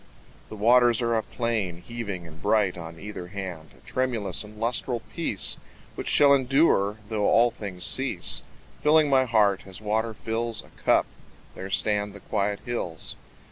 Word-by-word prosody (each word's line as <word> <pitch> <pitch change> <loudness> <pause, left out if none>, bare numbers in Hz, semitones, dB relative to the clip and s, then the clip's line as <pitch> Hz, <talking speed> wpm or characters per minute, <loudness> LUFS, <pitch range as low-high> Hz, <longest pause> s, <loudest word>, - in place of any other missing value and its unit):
The - - -7
waters 120 +2 +5
are 115 0 +1
a 110 - +2
plain, 110 -8 -2
Heaving 105 -7 -5
and 80 0 -13
bright 105 -3 +2
on 85 -1 -9
either 100 -3 -7
hand, 90 -4 -7
A - - -24
tremulous 125 -7 -1
and 105 0 -13
lustral 120 +1 -1
peace 160 - +1 0.4
Which - - -6
shall 145 -1 +6
endure 130 -6 +3
though 105 -2 0
all 120 +1 +5
things 100 -6 -5
cease, - - 0 0.4
Filling 150 -1 +4
my 130 -1 +5
heart 105 -5 +2
as 95 -1 -5
water 110 +1 -1
fills 115 0 -2
A - - -18
cup. - - +2 0.5
There 95 - -7
stand 105 0 +1
the 100 - -10
quiet 100 0 -1
hills. 90 -9 -3
110 Hz, 160 wpm, -26 LUFS, 100-120 Hz, 0.5 s, shall